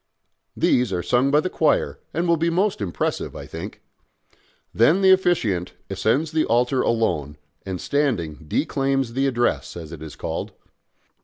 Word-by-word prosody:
These 125 -4 +2
are 90 -2 -1
sung 125 +3 +2
by 150 +2 +4
the 185 - -2
choir, 155 -2 +1
and 170 +2 -1
will 170 - +4
be 165 +1 0
most 185 - 0
impressive, 90 -4 -2
I - - -7
think. - - -8 0.9
Then 155 - +4
the 190 - +7
officiant 120 - +2 0.2
ascends 110 - +1
the 160 -1 +1
altar 125 +3 +2
alone, 75 -11 0 0.3
and, 95 -2 -3
standing, 110 - -1
declaims 135 - 0
the 135 +2 +1
Address, 120 -7 -1
as 80 -2 -8
it 80 -2 -9
is 80 -1 -8
called. - - -4
125 Hz, 155 wpm, -23 LUFS, 95-155 Hz, 0.9 s, the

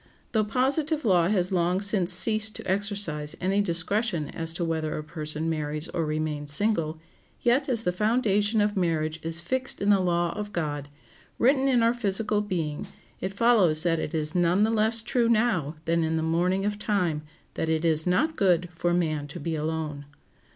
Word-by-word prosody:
Though 220 -2 +2
positive 280 +6 0
law 175 -5 +3
has 185 -2 0
long 180 0 +1
since 200 -3 +4
ceased 215 +3 +4
to - - -7
exercise 190 -6 -1
any 195 +3 +1
discretion 175 -2 0
as 165 0 -2
to 170 +1 -2
whether 160 -1 -2
a 155 - -5
person 155 0 -4
marries 150 -1 -3
or 165 -3 -2
remains 150 -1 -3
single, 165 -4 +2 0.4
yet, 260 +4 +1
as 230 -3 0
the 180 - +1
foundation 210 +1 +1
of 205 0 0
marriage 160 -3 -1
is 165 +1 -3
fixed 260 +10 0
in 205 +1 +2
the 200 - +4
law 175 -2 0
of 210 0 -6
God, 145 -4 -3 0.5
written 265 +2 +3
in 245 -3 +3
our 230 +1 +3
physical 210 -2 -1
being, 165 -7 -4 0.3
it 190 - -4
follows 200 -8 +3
that 165 -2 +1
it 155 - -4
is 155 0 -1
none 180 +2 +2
the 220 - +2
less 225 +1 +2
true 235 0 0
now 215 -10 +1
than 165 0 +1
in 160 0 -1
the 160 - -1
morning 180 +4 0
of 205 0 -2
time 180 -8 -1 0.3
that 160 - -3
it 160 +1 0
is 160 0 +1
"not 305 - +1
good 180 -3 +1
for 175 +1 -1
man 155 -4 -1
to 145 - -9
be 165 +2 -4
alone." 155 -2 -4
180 Hz, 185 wpm, -26 LUFS, 160-215 Hz, 0.5 s, since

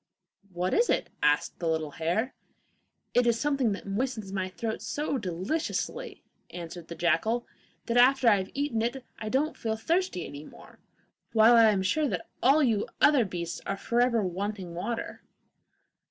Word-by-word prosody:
'What 180 +1 -1
is 475 +1 +3
it?' - - 0
asked 150 0 +2
the 170 - -2
little 160 -2 -1
hare. 175 - -1 0.8
'It 245 0 +3
is 230 -1 +2
something 275 -6 +1
that 195 - -7
moistens 215 0 -3
my 190 -1 -2
throat 220 +4 -4
so 290 -2 -2
deliciously,' 305 - -3 0.3
answered 170 -1 -8
the 170 - -7
jackal, 220 +9 +1 0.4
'that 235 - 0
after 260 +1 +5
I 210 -3 +7
have 190 -1 -4
eaten 275 -5 -1
it 245 +3 -2
I 215 - -4
don't 290 +6 0
feel 220 -1 -2
thirsty 325 - -1
any 145 +1 -8
more, - - -15 0.5
while 225 +1 +7
I 225 -1 +7
am 195 -3 +1
sure 295 +11 +1
that - - -3
all 280 +4 +5
you 225 -6 +1
other 280 -6 +5
beasts 175 -3 -5
are 195 - -2
for 235 +4 0
ever 235 -3 +2
wanting 190 0 -4
water. 230 +7 -4
220 Hz, 170 wpm, -28 LUFS, 185-255 Hz, 0.8 s, I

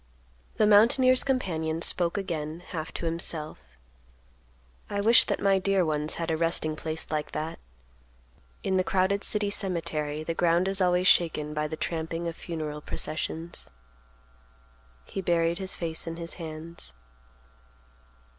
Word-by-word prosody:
The - - +3
mountaineer's 240 +5 +6
companion 165 -11 -1
spoke 175 +1 +2
again 165 -4 -3
half 165 -2 -6
to - - -3
himself; 165 -2 -2 1.3
"I 205 - -2
wish 225 +3 +6
that - - -1
my 195 -1 +3
dear 190 -1 +2
ones 150 -1 +1
had 165 -1 -2
a 160 - +1
resting 165 -1 +1
place 160 +1 -4
like 150 -1 -2
that. 160 +1 -4 1.0
In 190 - +1
the 185 - +3
crowded 190 +3 +1
city 210 -1 +3
cemetery 160 -6 -2
the 165 - -2
ground 170 +2 +2
is 195 0 +1
always 180 0 +3
shaken 155 -5 +3
by 150 0 -1
the 160 +1 -5
tramping 165 +1 -3
of 165 - -4
funeral 155 -4 -5
professions." 165 +2 -3 1.4
He 195 - -5
buried 170 -1 +1
his 190 0 -1
face 165 -1 -3
in 165 - -4
his 170 0 -3
hands. 155 - -6
170 Hz, 140 wpm, -28 LUFS, 160-185 Hz, 1.4 s, mountaineer's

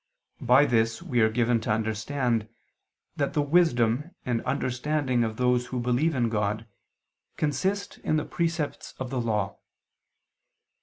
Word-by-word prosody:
By 125 +4 +5
this 115 -3 +1
we 120 -2 +1
are 110 - +5
given 120 0 +1
to - - -5
understand 110 +2 0 0.7
that 140 -1 0
the 150 - +3
wisdom 145 -2 +2
and 120 -2 0
understanding 130 0 0
of 110 -1 -3
those 125 -1 +2
who 125 - -3
believe 125 +6 +1
in 120 -2 +2
God 105 0 -1 0.7
consist 190 +7 -1
in 155 - 0
the 155 - -1
precepts 165 -3 -3
of 130 -1 -5
the 130 -2 -1
Law. 105 -4 -1
125 Hz, 140 wpm, -27 LUFS, 115-145 Hz, 0.7 s, By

